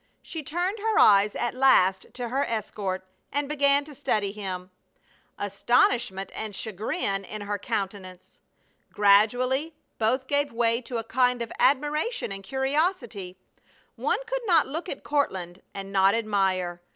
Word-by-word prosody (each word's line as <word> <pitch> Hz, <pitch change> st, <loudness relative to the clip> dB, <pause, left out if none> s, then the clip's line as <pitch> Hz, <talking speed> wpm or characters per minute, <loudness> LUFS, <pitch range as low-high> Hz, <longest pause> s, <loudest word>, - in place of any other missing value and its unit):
She 325 Hz, -, -6 dB
turned 355 Hz, +8 st, -2 dB
her 435 Hz, +1 st, 0 dB
eyes 205 Hz, -, +6 dB
at 240 Hz, -, -1 dB
last 195 Hz, -8 st, +4 dB
to 245 Hz, -2 st, -4 dB
her 270 Hz, +3 st, +1 dB
escort 200 Hz, -4 st, -3 dB, 0.3 s
and 285 Hz, 0 st, -1 dB
began 285 Hz, -1 st, +3 dB
to 300 Hz, -, -11 dB
study 205 Hz, -6 st, -1 dB
him, 185 Hz, -3 st, -6 dB, 0.7 s
astonishment 200 Hz, -1 st, +1 dB
and 215 Hz, -2 st, -5 dB
chagrin 200 Hz, -2 st, -2 dB
in 215 Hz, +2 st, -7 dB
her 205 Hz, 0 st, -3 dB
countenance. 190 Hz, -2 st, -5 dB, 0.5 s
Gradually 245 Hz, +9 st, +3 dB, 0.2 s
both 250 Hz, +4 st, +1 dB
gave 285 Hz, +1 st, 0 dB
way 230 Hz, 0 st, +1 dB
to 240 Hz, 0 st, -5 dB
a 225 Hz, -, -3 dB
kind 250 Hz, +1 st, +1 dB
of 230 Hz, -, -8 dB
admiration 295 Hz, -, +1 dB
and 195 Hz, 0 st, -6 dB
curiosity. 265 Hz, -, -1 dB, 0.6 s
One -, -, -1 dB
could -, -, -2 dB
not 335 Hz, -5 st, +5 dB
look 325 Hz, +6 st, -5 dB
at 275 Hz, -, -6 dB
Courtland 190 Hz, -11 st, -1 dB
and 195 Hz, 0 st, -7 dB
not 195 Hz, +1 st, +4 dB
admire. 190 Hz, -5 st, 0 dB
230 Hz, 140 wpm, -26 LUFS, 195-280 Hz, 0.7 s, eyes